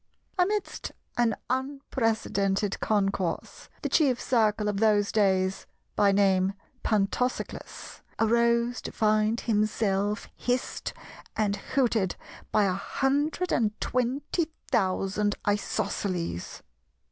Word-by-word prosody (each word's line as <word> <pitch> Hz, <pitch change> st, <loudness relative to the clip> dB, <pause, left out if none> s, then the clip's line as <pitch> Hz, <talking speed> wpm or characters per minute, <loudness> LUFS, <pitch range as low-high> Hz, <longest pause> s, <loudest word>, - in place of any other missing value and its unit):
Amidst 395 Hz, +2 st, -1 dB, 0.2 s
an 235 Hz, -3 st, +2 dB
unprecedented 225 Hz, -7 st, 0 dB
concourse, 195 Hz, -4 st, -1 dB
the -, -, 0 dB
Chief 265 Hz, -6 st, +3 dB
Circle 215 Hz, -3 st, +2 dB
of 205 Hz, -1 st, 0 dB
those 205 Hz, -1 st, +3 dB
days—by 195 Hz, 0 st, +1 dB
name 195 Hz, -1 st, +3 dB, 0.3 s
Pantocyclus—arose 235 Hz, +2 st, 0 dB
to -, -, -6 dB
find 215 Hz, +1 st, +2 dB
himself 210 Hz, -1 st, 0 dB
hissed 250 Hz, +1 st, -2 dB, 0.4 s
and 205 Hz, -2 st, +1 dB, 0.2 s
hooted 230 Hz, -8 st, +2 dB, 0.4 s
by 210 Hz, -, +4 dB
a 190 Hz, -2 st, +2 dB
hundred 285 Hz, -, 0 dB
and 215 Hz, -2 st, +1 dB
twenty 270 Hz, +7 st, 0 dB, 0.2 s
thousand 195 Hz, +1 st, +1 dB
Isosceles. 200 Hz, -, -2 dB
215 Hz, 90 wpm, -28 LUFS, 200-245 Hz, 0.4 s, by